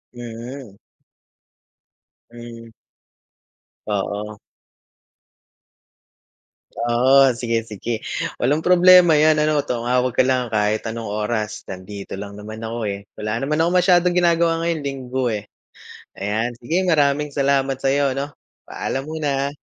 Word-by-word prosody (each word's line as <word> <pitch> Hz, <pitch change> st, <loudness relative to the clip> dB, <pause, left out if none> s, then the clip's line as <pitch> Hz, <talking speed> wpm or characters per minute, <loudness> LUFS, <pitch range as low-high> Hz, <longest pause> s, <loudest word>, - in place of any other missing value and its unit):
Mm. 120 Hz, -1 st, -9 dB, 1.5 s
Hmm. 120 Hz, -1 st, -11 dB, 1.2 s
Oo. 105 Hz, +1 st, -3 dB, 2.4 s
Oo, 130 Hz, +3 st, +4 dB
sige-sige, 115 Hz, -2 st, -3 dB, 0.4 s
walang 145 Hz, +5 st, +2 dB
problema 180 Hz, -1 st, +6 dB
'yan. 155 Hz, +1 st, +4 dB
Ano 150 Hz, -1 st, +2 dB
tumawag 125 Hz, +1 st, 0 dB
ka -, -, +3 dB
lang 125 Hz, -3 st, 0 dB
kahit 105 Hz, 0 st, 0 dB
anong 115 Hz, 0 st, -5 dB
oras, 105 Hz, +1 st, -3 dB
nandito 95 Hz, +1 st, -8 dB
lang 100 Hz, 0 st, -8 dB
naman 110 Hz, +1 st, -9 dB
ako, 115 Hz, +1 st, -4 dB
eh, 100 Hz, 0 st, -8 dB
wala 105 Hz, +2 st, -3 dB
naman 145 Hz, +4 st, -1 dB
akong 175 Hz, +2 st, +2 dB
masyadong 180 Hz, -1 st, +3 dB
ginagawa 170 Hz, -1 st, +3 dB
ngayon, 165 Hz, -3 st, -1 dB
Linggo, 130 Hz, -2 st, -2 dB
eh. 105 Hz, -1 st, -4 dB, 0.7 s
Ayan, 110 Hz, +4 st, -2 dB
sige 160 Hz, +10 st, -1 dB
maraming 150 Hz, -2 st, +2 dB
salamat 135 Hz, -1 st, +1 dB
sa'yo, 135 Hz, 0 st, +1 dB
'no. 140 Hz, +1 st, -4 dB, 0.3 s
Paalam 135 Hz, +1 st, -4 dB
muna. 145 Hz, -2 st, -2 dB
125 Hz, 110 wpm, -21 LUFS, 110-145 Hz, 2.4 s, problema